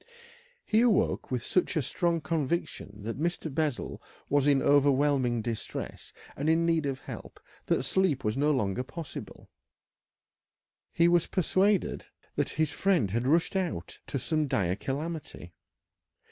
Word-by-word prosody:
He 220 Hz, +1 st, +3 dB
awoke 235 Hz, -4 st, +2 dB
with 125 Hz, -3 st, -2 dB
such 185 Hz, -, +1 dB
a 155 Hz, -, +2 dB
strong 170 Hz, +4 st, 0 dB
conviction 145 Hz, -, -3 dB
that 115 Hz, +4 st, -4 dB
Mr. 170 Hz, -3 st, -2 dB
Bessel 150 Hz, -3 st, -2 dB, 0.3 s
was 145 Hz, 0 st, +3 dB
in 140 Hz, -2 st, +5 dB
overwhelming 140 Hz, -4 st, +3 dB
distress 115 Hz, -1 st, -5 dB, 0.2 s
and 145 Hz, -, -3 dB, 0.2 s
need 165 Hz, -3 st, +2 dB
of 135 Hz, -1 st, -3 dB
help -, -, -9 dB, 0.3 s
that -, -, +2 dB
sleep 175 Hz, -9 st, +1 dB
was 105 Hz, 0 st, 0 dB
no 145 Hz, +3 st, +2 dB
longer 125 Hz, -6 st, +1 dB
possible. 145 Hz, -, -8 dB, 1.4 s
He 170 Hz, 0 st, +4 dB
was 175 Hz, -1 st, +3 dB
persuaded 190 Hz, +2 st, +1 dB, 0.3 s
that -, -, 0 dB
his 155 Hz, -2 st, +2 dB
friend 175 Hz, -, +1 dB
had 120 Hz, +4 st, 0 dB
rushed 165 Hz, +6 st, +2 dB
out 175 Hz, -, -3 dB
to 140 Hz, 0 st, -2 dB
some 155 Hz, +2 st, 0 dB
dire 95 Hz, -8 st, +1 dB
calamity. 140 Hz, -, -5 dB
145 Hz, 135 wpm, -29 LUFS, 125-170 Hz, 1.4 s, in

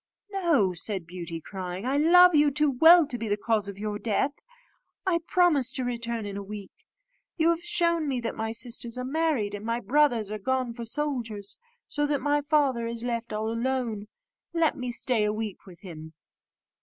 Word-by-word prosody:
"No," 325 Hz, -, +2 dB
said 185 Hz, +1 st, -3 dB
Beauty, 170 Hz, -1 st, -7 dB
crying, 185 Hz, +3 st, -6 dB
"I 265 Hz, +2 st, 0 dB
love 360 Hz, +4 st, +7 dB
you 295 Hz, -1 st, +5 dB
too 300 Hz, +1 st, +2 dB
well 325 Hz, +6 st, +7 dB
to 245 Hz, -4 st, -6 dB
be 225 Hz, -, -3 dB
the 205 Hz, 0 st, 0 dB
cause 215 Hz, -1 st, 0 dB
of 200 Hz, -1 st, -7 dB
your 210 Hz, 0 st, -4 dB
death; 230 Hz, +6 st, 0 dB, 0.7 s
I 355 Hz, -3 st, +2 dB
promise 305 Hz, -9 st, +3 dB
to 260 Hz, -, -1 dB
return 235 Hz, -2 st, -3 dB
in 200 Hz, -1 st, -6 dB
a 200 Hz, -, -4 dB
week. 200 Hz, 0 st, -8 dB, 0.7 s
You 325 Hz, 0 st, +3 dB
have 335 Hz, 0 st, -2 dB
shown 335 Hz, -2 st, +1 dB
me 265 Hz, -3 st, -1 dB
that 230 Hz, -, -3 dB
my 220 Hz, 0 st, -3 dB
sisters 235 Hz, 0 st, -2 dB
are 250 Hz, -, -3 dB
married, 280 Hz, -8 st, 0 dB
and 205 Hz, 0 st, -6 dB
my 230 Hz, +1 st, -1 dB
brothers 245 Hz, -6 st, +2 dB
are 215 Hz, -, -4 dB
gone 255 Hz, +2 st, -1 dB
for 235 Hz, 0 st, -7 dB
soldiers, 230 Hz, -7 st, -4 dB, 0.3 s
so 295 Hz, 0 st, -1 dB
that 290 Hz, -1 st, 0 dB
my 290 Hz, +1 st, +1 dB
father 280 Hz, -6 st, +1 dB
is 230 Hz, 0 st, -4 dB
left 235 Hz, -1 st, -3 dB
all 215 Hz, +1 st, -2 dB
alone. 230 Hz, -3 st, -2 dB, 0.5 s
Let 330 Hz, -2 st, +2 dB
me 250 Hz, -2 st, -4 dB
stay 240 Hz, -2 st, 0 dB
a 210 Hz, -, +1 dB
week 215 Hz, -2 st, -5 dB
with 175 Hz, -2 st, -14 dB
him." 160 Hz, -5 st, -10 dB
235 Hz, 195 wpm, -27 LUFS, 210-290 Hz, 0.7 s, love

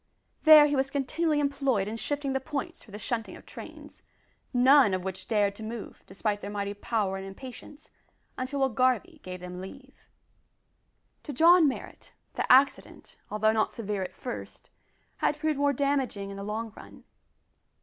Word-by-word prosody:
There 310 Hz, -1 st, +10 dB
he 290 Hz, -1 st, +1 dB
was 270 Hz, 0 st, +1 dB
continually 295 Hz, +3 st, 0 dB
employed 275 Hz, -8 st, 0 dB
in 215 Hz, -, -4 dB
shifting 285 Hz, +3 st, -3 dB
the 265 Hz, -, +1 dB
points 275 Hz, +1 st, -5 dB
for -, -, -19 dB
the 205 Hz, -, -8 dB
shunting 225 Hz, +2 st, -4 dB
of -, -, -14 dB
trains, -, -, -11 dB, 0.5 s
none 255 Hz, -4 st, +5 dB
of 185 Hz, -, -4 dB
which 190 Hz, 0 st, -6 dB
dared 205 Hz, -3 st, +2 dB
to -, -, -10 dB
move, 225 Hz, 0 st, -7 dB
despite 205 Hz, +2 st, -2 dB
their 200 Hz, -, -6 dB
mighty 200 Hz, -1 st, -3 dB
power 205 Hz, -2 st, -1 dB
and 190 Hz, -, -7 dB
impatience, 260 Hz, +8 st, -11 dB, 0.4 s
until 265 Hz, +2 st, -3 dB
Will 270 Hz, -, +3 dB
Garvie 255 Hz, +8 st, 0 dB
gave 180 Hz, -1 st, -8 dB
them 180 Hz, 0 st, -7 dB
leave. 260 Hz, +8 st, -12 dB, 1.1 s
To 295 Hz, -, -7 dB
John 335 Hz, +3 st, +6 dB
Marrot, 265 Hz, -, -6 dB, 0.2 s
the -, -, 0 dB
accident 270 Hz, +2 st, +2 dB
although 215 Hz, +1 st, +2 dB
not 220 Hz, -1 st, +1 dB
severe 210 Hz, -3 st, -4 dB
at 185 Hz, -, -5 dB
first, 245 Hz, -, -8 dB, 0.5 s
had 295 Hz, -, 0 dB
proved 310 Hz, -2 st, -1 dB
more 285 Hz, 0 st, +3 dB
damaging 270 Hz, -8 st, -1 dB
in 195 Hz, -, -8 dB
the 200 Hz, -, -6 dB
long 215 Hz, +1 st, -4 dB
run. -, -, -13 dB
245 Hz, 170 wpm, -28 LUFS, 205-280 Hz, 1.1 s, There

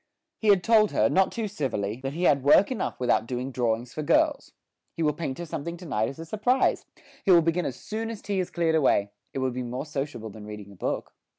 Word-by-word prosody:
He 220 Hz, -, -2 dB
had 195 Hz, -3 st, +5 dB
told 220 Hz, -2 st, +4 dB
her, -, -, +3 dB
not 190 Hz, 0 st, +3 dB
too 225 Hz, -2 st, -3 dB
civilly, 115 Hz, -, -2 dB
that 135 Hz, +1 st, -4 dB
he 170 Hz, +4 st, -3 dB
had 140 Hz, -5 st, +4 dB
work 185 Hz, -, +5 dB
enough 245 Hz, -, -3 dB
without 120 Hz, -2 st, +1 dB
doing 125 Hz, +2 st, -3 dB
drawings 120 Hz, 0 st, -1 dB
for 155 Hz, -, -4 dB
girls. 300 Hz, -, +2 dB, 0.5 s
He 165 Hz, -, 0 dB
will 150 Hz, -1 st, +2 dB
paint 145 Hz, -4 st, -4 dB
her 175 Hz, -, -5 dB
something 170 Hz, +2 st, -5 dB
to 175 Hz, -, -11 dB
night 110 Hz, -7 st, 0 dB
as 135 Hz, -, -9 dB
a 165 Hz, -, -7 dB
surprise; 215 Hz, +9 st, +1 dB, 0.4 s
he -, -, -2 dB
will 170 Hz, -3 st, +7 dB
begin 165 Hz, +1 st, +1 dB
as 125 Hz, -, -4 dB
soon 225 Hz, +1 st, -4 dB
as 225 Hz, -2 st, -6 dB
tea 200 Hz, -2 st, -2 dB
is 180 Hz, -1 st, -1 dB
cleared 170 Hz, -2 st, 0 dB
away; 115 Hz, -10 st, +3 dB, 0.2 s
it -, -, -6 dB
will 130 Hz, -1 st, 0 dB
be 125 Hz, +1 st, -4 dB
more 125 Hz, +3 st, -4 dB
sociable 135 Hz, -7 st, -5 dB
than 105 Hz, 0 st, -10 dB
reading 105 Hz, -1 st, -8 dB
a -, -, -14 dB
book. -, -, -3 dB
150 Hz, 240 wpm, -26 LUFS, 125-190 Hz, 0.5 s, will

